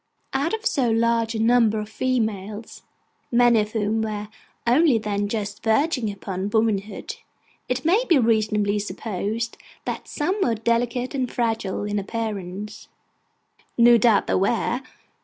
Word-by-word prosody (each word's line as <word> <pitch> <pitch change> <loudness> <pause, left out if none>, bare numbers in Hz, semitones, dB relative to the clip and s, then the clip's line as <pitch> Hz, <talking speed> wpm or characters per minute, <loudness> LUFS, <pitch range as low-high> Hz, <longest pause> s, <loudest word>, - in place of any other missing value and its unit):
Out 280 +5 0
of 445 +1 -10
so 260 - +2
large 230 0 +1
a - - -2
number 225 -1 +3
of 210 - -5
females, 220 -3 -2 0.5
many 240 -1 +5
of 210 0 -2
whom 220 0 0
were 210 -1 -4 0.4
only 260 +2 +4
then 205 -2 -1
just 205 -1 -4
verging 235 +1 +1
upon 195 -1 -4
womanhood, 215 -2 -1 0.5
it 250 +2 -2
may 390 +9 +4
be 335 - +6
reasonably 215 -3 +2
supposed 215 +2 -4 0.3
that - - -4
some 370 +8 -1
were 235 -9 +2
delicate 235 +3 0
and 260 -3 -2
fragile 225 -5 -1
in 205 0 -1
appearance: 210 -1 -5 0.9
no 235 0 +7
doubt 220 -2 +4
there - - +1
were. 235 +5 0
225 Hz, 140 wpm, -23 LUFS, 210-240 Hz, 0.9 s, no